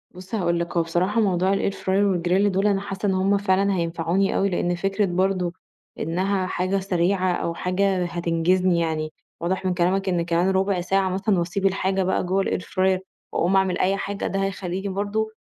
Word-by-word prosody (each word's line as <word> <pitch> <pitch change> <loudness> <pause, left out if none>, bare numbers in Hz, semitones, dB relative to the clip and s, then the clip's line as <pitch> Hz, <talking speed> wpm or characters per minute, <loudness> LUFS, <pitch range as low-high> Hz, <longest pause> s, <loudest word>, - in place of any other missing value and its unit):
بُصّ، 185 +4 -7
هاقول 170 -4 0
لك 170 +1 -3
هو 170 - +3
بصراحة 180 +7 0
موضوع 190 -2 +2
الair 195 - 0
fryer 195 +1 +1
والgrill 180 +4 +2
دول 195 +1 +1
أنا 195 -1 +1
حاسّة 195 0 -5
إن 190 - +2
هُم 195 +2 +2
فعلًا 195 0 +2
هينفعوني 170 +2 0
أوي، 200 - +2
لأن 175 -1 0
فكرة 195 +3 0
برضه 185 -1 0 0.5
إنها 185 +4 0
حاجة 185 +2 -1
سريعة، 185 0 +1
أو 170 -1 -2
حاجة 185 +1 0
هتنجزني 175 +1 +1
يعني، 155 -1 -2 0.3
واضح 190 +2 -1
من 185 - +1
كلامك 190 +2 +1
إن 175 -2 0
كمان 175 +2 +1
رُبع 190 -1 +1
ساعة 190 +1 +1
مثلًا 190 +1 +1
وأسيب 175 +3 -2
الحاجة 190 0 +1
بقى 185 +1 0
جوّه 190 +2 +1
الair 180 - -1
fryer 185 0 +1 0.3
وأقوم 180 +3 +1
أعمل 190 -1 +2
أي 195 +2 +2
حاجة، 200 0 -3
ده 195 0 -1
هيخليني 190 0 -3
برضه 205 +3 -2
185 Hz, 185 wpm, -23 LUFS, 175-195 Hz, 0.5 s, هو